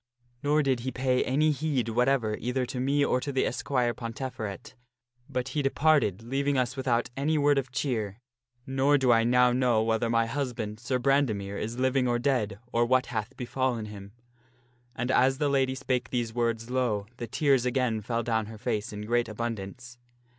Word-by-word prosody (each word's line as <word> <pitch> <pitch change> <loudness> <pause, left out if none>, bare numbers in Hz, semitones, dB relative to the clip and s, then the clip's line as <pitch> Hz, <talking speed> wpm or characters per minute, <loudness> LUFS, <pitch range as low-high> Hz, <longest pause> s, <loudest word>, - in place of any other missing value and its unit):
Nor 150 +1 +2
did 135 -3 +1
he 125 +3 -3
pay 130 0 +1
any 155 +4 +2
heed 140 -5 -1
whatever 120 -2 +1
either 125 +1 -1
to 125 - -5
me 140 +3 +2
or 125 - +1
to 140 - -3
the 135 - +1
esquire 125 -3 0
Ponteferet, 115 -4 -6 0.6
but 130 -1 -2
he 145 +3 -1
departed 135 - +2
leaving 140 +3 0
us 125 0 0
without 120 -3 0
any 150 +3 +1
word 145 -1 +4
of 130 -1 -6
cheer; 115 -6 -2 0.5
nor 135 +1 +3
do 130 -2 +3
I 115 -1 +5
now 125 +1 +4
know 120 -3 +2
whether 115 +1 0
my 115 0 +3
husband, 115 -4 -3
Sir 125 +2 -1
Brandemere, 120 -7 0
is 115 +3 -4
living 130 0 +2
or 120 0 +2
dead, 120 -6 0
or 120 - +2
what 130 +2 +3
hath 110 +4 -3
befallen 125 -2 -1
him." 100 -1 -10 0.8
And 125 +3 -1
as 130 +1 +3
the 145 0 +1
lady 135 -1 +1
spake 125 -2 -2
these 120 -3 -2
words, 115 0 -1
lo! 120 -6 0
the 120 - -5
tears 135 0 +2
again 125 -3 0
fell 115 +2 -2
down 110 -2 0
her 110 0 -9
face 110 -2 -2
in 105 0 -6
great 120 +1 +1
abundance. 115 +2 -6
125 Hz, 185 wpm, -28 LUFS, 115-135 Hz, 0.8 s, I